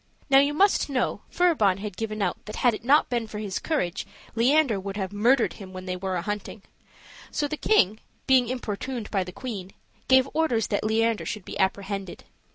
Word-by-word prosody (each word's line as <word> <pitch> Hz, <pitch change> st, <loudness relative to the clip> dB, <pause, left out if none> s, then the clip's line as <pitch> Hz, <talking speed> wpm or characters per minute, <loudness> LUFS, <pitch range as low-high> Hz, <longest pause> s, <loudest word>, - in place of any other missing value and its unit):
Now 270 Hz, -, +8 dB
you 285 Hz, +1 st, +2 dB
must 395 Hz, -2 st, +3 dB
know 265 Hz, -2 st, -1 dB
Furibon 290 Hz, -, +3 dB
had 205 Hz, -2 st, -6 dB
given 215 Hz, 0 st, -3 dB
out -, -, -2 dB
that 215 Hz, -, -7 dB
had 245 Hz, -, +6 dB
it 215 Hz, -, -6 dB
not 285 Hz, +5 st, +4 dB
been 235 Hz, -3 st, -2 dB
for 210 Hz, -, -7 dB
his 205 Hz, -3 st, -3 dB
courage 235 Hz, -, -2 dB, 0.3 s
Leander 245 Hz, -1 st, +3 dB
would 195 Hz, +1 st, -6 dB
have 190 Hz, -1 st, -3 dB
murdered 235 Hz, +5 st, +3 dB
him 190 Hz, -3 st, -11 dB
when 185 Hz, 0 st, -7 dB
they 185 Hz, -1 st, -3 dB
were 185 Hz, 0 st, -3 dB
a 175 Hz, -, -2 dB
hunting; 205 Hz, 0 st, -5 dB, 0.7 s
so 295 Hz, -, -1 dB
the 305 Hz, -, -3 dB
king, 215 Hz, -, +3 dB, 0.3 s
being 260 Hz, -2 st, +4 dB
importuned 245 Hz, -1 st, -4 dB
by 195 Hz, -3 st, +1 dB
the 180 Hz, -, -8 dB
queen, 195 Hz, -4 st, -7 dB, 0.3 s
gave 260 Hz, 0 st, +5 dB
orders 280 Hz, -9 st, +1 dB
that 205 Hz, -, 0 dB
Leander 225 Hz, +1 st, +1 dB
should 210 Hz, -4 st, -5 dB
be -, -, -7 dB
apprehended. 195 Hz, 0 st, -2 dB
215 Hz, 195 wpm, -26 LUFS, 195-260 Hz, 0.7 s, Now